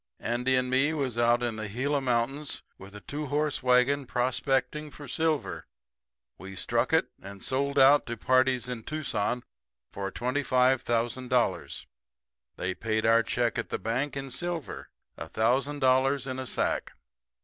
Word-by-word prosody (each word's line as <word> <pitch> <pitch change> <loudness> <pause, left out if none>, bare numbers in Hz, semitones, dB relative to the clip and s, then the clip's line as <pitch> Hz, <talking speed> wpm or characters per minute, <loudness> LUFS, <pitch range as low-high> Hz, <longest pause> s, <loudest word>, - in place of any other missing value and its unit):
Andy 125 +3 0
and 125 0 +1
me 135 +4 +3
was 135 -6 -2
out 120 +1 +3
in 115 -2 -2
the 110 -1 -4
Gila 140 +6 0
mountains 135 +4 -1 0.2
with 95 +2 -12
a 105 - -9
two 150 +5 -5
horse 150 +1 0
wagon 130 +2 +3
prospecting 135 +4 0
for 145 0 -11
silver. 160 +2 -1 0.7
We 95 0 -9
struck 115 +7 0
it, 160 0 +2
and 100 0 -9
sold 140 +2 0
out 140 +2 +6
to 120 0 -4
parties 130 0 +2
in 125 -2 -4
Tucson 125 -4 -2 0.5
for 100 0 -4
$25,000. 125 -1 0 0.7
They 95 +1 -2
paid 110 +2 -1
our 115 +1 +5
check 120 +1 -1
at - - -4
the - - -1
bank 125 +8 -2
in 135 -1 -5
silver 175 -3 -4 0.3
a 75 - -6
thousand 135 - 0
dollars 130 +1 +3
in 130 -1 -4
a 130 - -4
sack. - - -1
130 Hz, 150 wpm, -28 LUFS, 115-140 Hz, 0.7 s, out